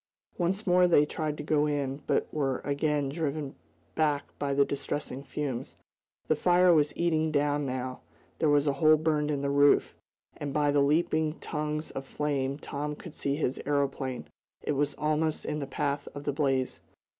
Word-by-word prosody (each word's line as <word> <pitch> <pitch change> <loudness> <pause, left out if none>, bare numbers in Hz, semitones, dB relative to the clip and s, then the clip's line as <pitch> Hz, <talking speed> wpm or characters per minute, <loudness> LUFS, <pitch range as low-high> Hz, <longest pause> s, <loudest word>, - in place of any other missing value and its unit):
Once 190 +5 0
more 180 -1 +5
they 150 -4 +5
tried 150 -1 -3
to - - -5
go 150 0 +2
in, 140 -1 -2
but - - +2
were 135 -4 0
again 145 0 0
driven 145 -1 -3 0.4
back 145 +2 +1 0.2
by 140 -1 -1
the 140 0 +4
distressing 140 -1 -4
fumes. 135 -2 -4 0.5
The 155 - +3
fire 180 +2 +5
was 150 -2 +3
eating 160 -2 +1
down, 145 -1 +1
now. 130 0 -4 0.4
There 155 - +3
was 145 0 +4
a 145 - +2
hole 155 +3 +5
burned 150 -1 +1
in 140 -2 -1
the 140 - 0
roof, 145 0 +4 0.4
and 145 -1 -4
by 145 -1 +3
the 145 0 +3
leaping 155 +1 +1
tongues 150 0 -3
of 135 0 -6
flame 140 -2 -1
Tom 150 0 -4
could 165 +1 -10
see 140 0 -1
his 140 -4 -1
aeroplane. 140 -3 -1 0.4
It - - -1
was 145 0 0
almost 155 +1 0
in 150 0 -2
the 140 - -4
path 140 +1 -2
of 145 - -6
the 145 - -1
blaze. 135 -3 0
145 Hz, 180 wpm, -29 LUFS, 140-155 Hz, 0.5 s, more